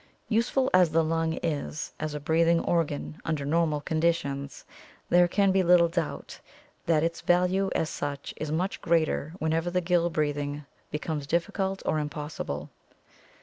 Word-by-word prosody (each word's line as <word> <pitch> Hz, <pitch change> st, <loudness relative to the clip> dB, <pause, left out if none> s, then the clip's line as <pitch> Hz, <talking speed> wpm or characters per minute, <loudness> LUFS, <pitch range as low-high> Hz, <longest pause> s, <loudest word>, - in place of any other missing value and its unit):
Useful 245 Hz, +4 st, +2 dB
as 180 Hz, -2 st, +6 dB
the 165 Hz, +1 st, +2 dB
lung 165 Hz, 0 st, 0 dB
is 150 Hz, -1 st, -3 dB
as 155 Hz, -1 st, -3 dB
a -, -, -3 dB
breathing 165 Hz, +3 st, +3 dB
organ 160 Hz, -2 st, -1 dB
under 155 Hz, -4 st, -2 dB
normal 155 Hz, -1 st, +1 dB
conditions, 145 Hz, -3 st, -1 dB, 0.4 s
there 175 Hz, 0 st, +5 dB
can 195 Hz, +2 st, +2 dB
be 190 Hz, 0 st, +3 dB
little 175 Hz, -1 st, +5 dB
doubt 165 Hz, -2 st, -4 dB, 0.5 s
that 160 Hz, -2 st, +3 dB
its 165 Hz, 0 st, -1 dB
value 180 Hz, +2 st, +2 dB
as 160 Hz, -, +1 dB
such 145 Hz, -1 st, -4 dB
is 155 Hz, -1 st, -4 dB
much 180 Hz, +5 st, -1 dB
greater 165 Hz, -1 st, +1 dB
whenever 160 Hz, 0 st, 0 dB
gill 175 Hz, -1 st, +2 dB
breathing 145 Hz, -2 st, -2 dB, 0.2 s
becomes 150 Hz, -1 st, -3 dB
difficult 190 Hz, +4 st, -1 dB
or 155 Hz, -, +1 dB
impossible. 150 Hz, -, -5 dB
165 Hz, 145 wpm, -27 LUFS, 150-175 Hz, 0.5 s, as